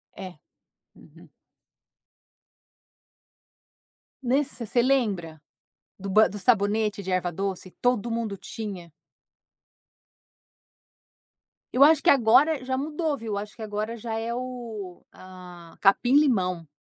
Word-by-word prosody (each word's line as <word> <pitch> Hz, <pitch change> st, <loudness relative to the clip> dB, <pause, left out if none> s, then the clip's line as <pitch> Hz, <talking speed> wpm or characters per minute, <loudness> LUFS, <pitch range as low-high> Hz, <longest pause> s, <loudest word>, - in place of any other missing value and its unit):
É. 185 Hz, -4 st, -9 dB, 0.6 s
Uhum. -, -, -18 dB, 2.9 s
Nesse, 260 Hz, -1 st, -1 dB
você 240 Hz, +3 st, +2 dB
lembra? 200 Hz, -, 0 dB, 0.6 s
Do 195 Hz, +1 st, -6 dB
ba 215 Hz, +3 st, +5 dB
do 205 Hz, -, -7 dB
sabonete 210 Hz, -1 st, +1 dB
de 190 Hz, -, -5 dB
erva-doce, 185 Hz, +1 st, -2 dB
todo 245 Hz, -2 st, +1 dB
mundo 225 Hz, -3 st, -3 dB
tinha. 190 Hz, -7 st, -8 dB, 2.8 s
Eu 265 Hz, +3 st, +6 dB
acho 310 Hz, 0 st, +6 dB
que -, -, +3 dB
agora 275 Hz, +3 st, +4 dB
já 260 Hz, 0 st, -2 dB
mudou, 300 Hz, +1 st, -2 dB
viu, 225 Hz, -3 st, -5 dB
eu -, -, -1 dB
acho 210 Hz, +1 st, -6 dB
que 225 Hz, -, -12 dB
agora 215 Hz, +2 st, -4 dB
já 225 Hz, 0 st, -6 dB
é, 230 Hz, +1 st, -3 dB
o, 235 Hz, -7 st, -7 dB
hã, 180 Hz, -2 st, -13 dB
capim-limão. 195 Hz, -, +3 dB
220 Hz, 105 wpm, -25 LUFS, 190-250 Hz, 2.9 s, Eu